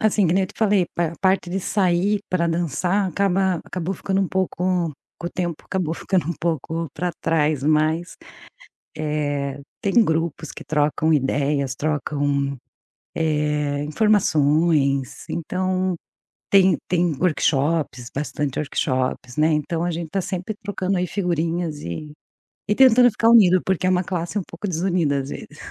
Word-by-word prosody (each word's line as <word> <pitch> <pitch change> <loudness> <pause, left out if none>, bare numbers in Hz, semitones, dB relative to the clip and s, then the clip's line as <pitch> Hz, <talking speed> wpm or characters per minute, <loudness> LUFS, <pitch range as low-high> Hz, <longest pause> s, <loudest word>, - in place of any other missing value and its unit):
assim, 210 -3 +3
que 165 - +2
nem 190 - +3
eu - - -5
te - - -15
falei, 205 -4 +3
a 170 -1 0
parte 190 -2 +2
de 190 - -1
sair 195 +1 +1
para 170 -2 +1
dançar 175 +4 0
acaba 190 -1 +1
acabou 185 +1 -3
ficando 195 +2 -1
um 190 - 0
pouco 180 -3 0 0.3
o 170 - -2
tempo 175 -3 -2
acabou 175 -4 -2
ficando 180 -2 -1
um 170 - -1
pouco 165 0 -2
para 180 0 -1
trás 155 -3 +1
mas, 155 +3 +1 0.8
eh, 145 -2 -2 0.2
tem 200 - 0
grupos 160 -1 -1
que - - -10
trocam 150 +1 +1
ideias, 140 -1 0
trocam, 145 -2 -1 0.6
eh, 150 -2 0
informações, 150 - +2
então, 185 +2 -1 0.5
tem 190 -1 +5
tem 175 -2 +2
workshops, 145 -5 0
bastante 145 -1 -2
workshops, 130 -3 -2
né, 155 +1 +3
então, 160 +2 -1
a 175 - 0
gente 165 0 -4
está 195 +5 -2
sempre 185 +2 -4
trocando 195 -1 -1
aí 180 0 0
figurinhas 170 -4 -1
e 115 - -6 0.6
e 210 - +2
tentando 250 -2 +6
ficar 225 +2 +1
unido 185 -6 +6
porque 190 -1 0
é - - +3
uma 185 0 +1
classe 175 +3 -2
um - - -4
pouco 210 - -6
desunida 170 -5 +1
às 135 +1 -5
vezes. - - -9
170 Hz, 150 wpm, -22 LUFS, 150-185 Hz, 0.8 s, tentando